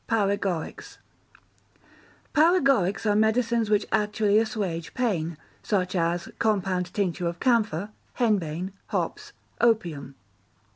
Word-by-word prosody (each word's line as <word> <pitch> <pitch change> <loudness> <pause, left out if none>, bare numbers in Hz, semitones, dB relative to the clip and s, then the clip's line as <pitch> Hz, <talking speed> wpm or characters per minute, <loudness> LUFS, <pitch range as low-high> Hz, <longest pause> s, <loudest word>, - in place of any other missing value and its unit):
Paregorics 200 -6 -1 1.4
Paregorics 275 - +3
are 210 -1 +3
medicines 225 +1 +2
which 210 -1 +2
actually 210 0 +2
assuage 200 -8 -3
pain, 170 - -1 0.2
such 185 -3 -1
as 170 0 0
compound 190 -4 0
tincture 180 -3 -1
of 170 0 -4
camphor, 215 -6 +1 0.2
henbane, 190 -6 0 0.2
hops, - - -3 0.3
opium. 170 - +1
200 Hz, 95 wpm, -26 LUFS, 175-225 Hz, 1.4 s, Paregorics